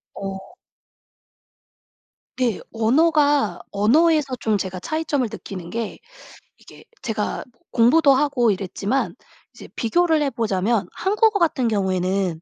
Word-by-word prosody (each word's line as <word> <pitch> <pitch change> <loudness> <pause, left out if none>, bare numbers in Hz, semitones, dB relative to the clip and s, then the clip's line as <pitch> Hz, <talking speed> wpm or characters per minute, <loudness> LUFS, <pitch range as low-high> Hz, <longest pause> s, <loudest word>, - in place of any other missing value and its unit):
어. 195 - -7 1.9
네. 245 -5 0
언어가 285 - +2
언어에서 280 +7 +3
좀 220 -2 +1
제가 185 -2 -4
차이점을 300 - -1
느끼는 185 -4 -8
게 225 +2 -4 0.6
이게 - - -16 0.2
제가 215 -4 -3 0.3
공부도 275 +5 +5
하고 265 -4 +2
이랬지만 200 +6 -2 0.4
이제 - - -12
비교를 320 +6 +2
해보자면 220 -5 0
한국어 425 +2 +1
같은 310 -8 +1
경우에는 190 -4 -1
230 Hz, 245 characters per minute, -22 LUFS, 195-295 Hz, 1.9 s, 공부도